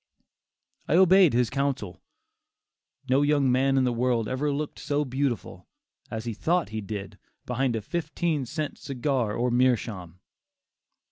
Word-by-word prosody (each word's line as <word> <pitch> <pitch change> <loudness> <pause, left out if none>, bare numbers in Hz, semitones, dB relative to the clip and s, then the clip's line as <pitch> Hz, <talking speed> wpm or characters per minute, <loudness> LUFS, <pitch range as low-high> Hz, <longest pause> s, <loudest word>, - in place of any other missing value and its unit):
I 155 - +2
obeyed 185 -3 +6
his 120 -2 +2
counsel. 135 -9 -2 1.1
No 130 +2 +3
young 145 -3 +3
man 135 +2 +2
in 130 - +3
the 125 -1 +1
world 120 -2 0
ever 145 +3 -1
looked 145 +1 -4
so 145 +1 -1
beautiful, 130 -3 -3 0.4
as 110 +1 -5
he 115 - -3
thought 170 - 0
he 110 0 -4
did, 100 -1 -7 0.3
behind 125 0 0
a 110 - -3
fifteen 160 - -2
cent 150 +3 -4
cigar 130 -5 -1
or 125 +1 0
a - - -2
meerschaum! 110 -8 0
130 Hz, 145 wpm, -26 LUFS, 115-145 Hz, 1.1 s, obeyed